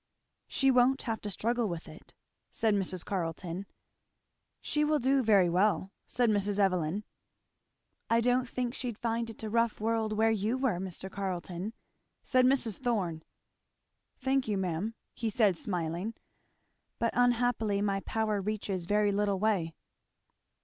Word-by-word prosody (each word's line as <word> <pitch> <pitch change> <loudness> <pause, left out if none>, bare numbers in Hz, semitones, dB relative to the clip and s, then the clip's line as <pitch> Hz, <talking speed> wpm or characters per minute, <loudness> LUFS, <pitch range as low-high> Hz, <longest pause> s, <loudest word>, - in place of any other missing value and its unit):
"She 270 0 +3
won't 255 +2 +4
have 225 -2 -3
to 210 - -4
struggle 230 +2 0
with 170 -1 -5
it," 155 -1 -14 0.3
said 220 -2 +1
Mrs. 185 -3 -2
Carleton. 180 0 -3 0.9
"She 300 - 0
will 300 0 +3
do 270 +1 +3
very 205 -6 +5
well," 190 +2 +2 0.2
said 245 -1 +2
Mrs. 205 -1 0
Evelyn. 185 -1 +1 1.1
"I 230 - +4
don't 245 +1 +2
think 245 -1 -2
she'd 245 -5 -4
find 230 0 -1
it 225 - -10
a 215 - -3
rough 230 0 +1
world, 220 0 0
where 220 +1 +3
you 220 +3 0
were, 255 -9 0
Mr. 190 0 -5
Carleton," 185 +1 -4 0.5
said 255 -1 +3
Mrs. 250 -6 +1
Thorn. 195 -11 -1 1.0
"Thank 265 -1 0
you 210 -2 0
ma'am," 190 +4 -2 0.2
he 230 - -2
said 210 -3 +3
smiling. 175 +4 -3 0.8
"But 230 - 0
unhappily 245 -4 +2
my 200 -1 +1
power 215 0 -1
reaches 195 -3 -3
very 210 0 +3
little 200 -1 +1
way." 185 -6 0
215 Hz, 145 wpm, -30 LUFS, 190-235 Hz, 1.1 s, very